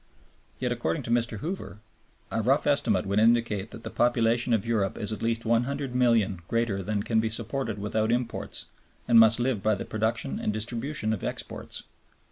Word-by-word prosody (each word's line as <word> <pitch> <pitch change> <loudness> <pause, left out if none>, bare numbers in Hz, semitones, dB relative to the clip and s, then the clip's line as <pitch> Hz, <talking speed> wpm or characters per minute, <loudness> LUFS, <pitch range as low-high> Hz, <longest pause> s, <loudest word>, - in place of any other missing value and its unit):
Yet, - - -2
according 80 +1 -1
to 115 - -4
Mr. 115 -3 0
Hoover, 175 - -5 0.5
"a - - 0
rough - - +2
estimate - - +2
would 100 +2 +1
indicate 115 -2 +2
that 115 - -11
the - - -6
population 120 0 +2
of 110 -4 +2
Europe 110 -4 0
is 105 -1 -4
at - - -6
least 115 0 0
100,000,000 120 -4 +1
greater 115 -4 0
than 100 +1 -2
can 110 0 +1
be 110 0 +1
supported 115 0 -3
without 110 +2 0
imports, 120 0 -2 0.4
and 115 -1 +7
must 115 +1 +6
live 120 -4 0
by 110 +1 +2
the - - -5
production 110 +1 -1
and - - 0
distribution 115 +2 -2
of 105 - -4
exports." - - -5
115 Hz, 175 wpm, -27 LUFS, 110-120 Hz, 0.5 s, and